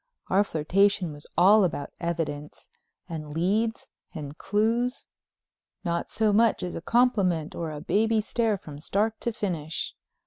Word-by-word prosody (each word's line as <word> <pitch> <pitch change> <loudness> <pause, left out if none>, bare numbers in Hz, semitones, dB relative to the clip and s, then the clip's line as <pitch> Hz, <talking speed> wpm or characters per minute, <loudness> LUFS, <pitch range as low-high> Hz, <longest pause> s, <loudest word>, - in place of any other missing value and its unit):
Our 195 +2 +5
flirtation 185 +1 +2
was 145 0 -11
all 200 +4 +7
about 155 -5 -2
evidence, 155 -4 -4 0.4
and 155 -3 -6
leads, 215 +7 0 0.3
and 145 -2 -6
clues—not 215 -5 -3
so 215 -2 +1
much 225 +1 +3
as 180 - -3
a - - -5
compliment 200 -8 +2
or 165 -2 -4
a 150 -1 -6
baby 220 +6 +2
stare 220 0 0
from 150 -5 -10
start 215 +7 -1
to 235 - 0
finish. 165 -8 -3
185 Hz, 135 wpm, -27 LUFS, 160-220 Hz, 0.4 s, all